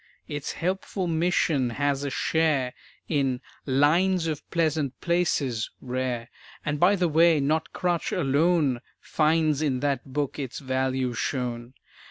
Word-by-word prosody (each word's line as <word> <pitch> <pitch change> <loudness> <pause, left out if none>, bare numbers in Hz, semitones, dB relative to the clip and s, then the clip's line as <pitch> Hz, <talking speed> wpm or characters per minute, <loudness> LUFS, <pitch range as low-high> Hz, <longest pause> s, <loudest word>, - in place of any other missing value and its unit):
Its 145 -2 -4
helpful 190 +2 -2
mission 165 -5 +1
has 140 +3 0
a 140 - -1
share 145 -3 +1 0.3
In 135 -5 0 0.3
"Lines 165 +7 +3
of 155 -2 -2
Pleasant 155 -5 0
Places" 150 -10 0
rare. 125 -2 -3 0.4
And, 145 0 -1
by 185 +5 +5
the 180 -2 +1
way, 165 0 +5
not 155 +3 0
crutch 175 -2 -1
alone 145 -4 +2 0.2
Finds 155 -1 +1
in 135 -5 0
that 140 -3 0
book 145 +1 -2
its 135 -4 -4
value 130 -1 -1
shown. 120 0 -3
145 Hz, 130 wpm, -26 LUFS, 130-165 Hz, 0.4 s, by